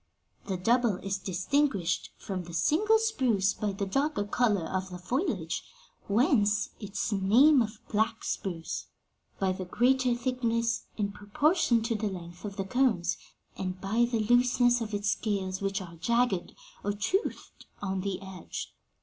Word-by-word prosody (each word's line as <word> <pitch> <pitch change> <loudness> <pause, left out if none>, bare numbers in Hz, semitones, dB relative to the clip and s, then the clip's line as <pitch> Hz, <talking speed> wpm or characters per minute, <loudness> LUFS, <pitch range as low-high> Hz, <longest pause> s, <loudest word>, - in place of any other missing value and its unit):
The 190 -2 -1
double 235 +3 +2
is 195 0 -1
distinguished 190 - 0
from 185 -3 -5
the 170 -1 -8
single 390 - +4
spruce 250 - +1
by 210 -1 -2
the 200 +1 -3
darker 275 +5 0
color 205 -4 +1
of 185 +1 -3
the 180 - -7
foliage 255 - -2 0.4
whence 210 -1 +3
its 205 +2 -3
name 235 +9 +5
of 215 -1 -3
black 220 +1 0
spruce 170 -4 -3 0.5
by 190 -1 +2
the 185 0 -4
greater 250 +5 +2
thickness, 235 -2 -1
in 205 -2 -1
proportion 240 - +2
to 230 +1 0
the 215 -1 -1
length, 175 -1 -9
of 200 -1 -5
the 195 -1 -3
cones, 220 -5 +2 0.4
and 185 -1 -4
by 220 +5 +2
the 230 -2 +1
looseness 245 +1 +4
of 215 -2 -3
its 205 0 +1
scales, 190 -3 -2
which 195 0 -1
are 170 -2 -11
jagged, 235 -1 +1 0.3
or 205 - 0
toothed, 375 - -2
on 190 -1 -2
the 195 -1 -2
edge.' 190 -3 -7
210 Hz, 150 wpm, -29 LUFS, 190-245 Hz, 0.5 s, name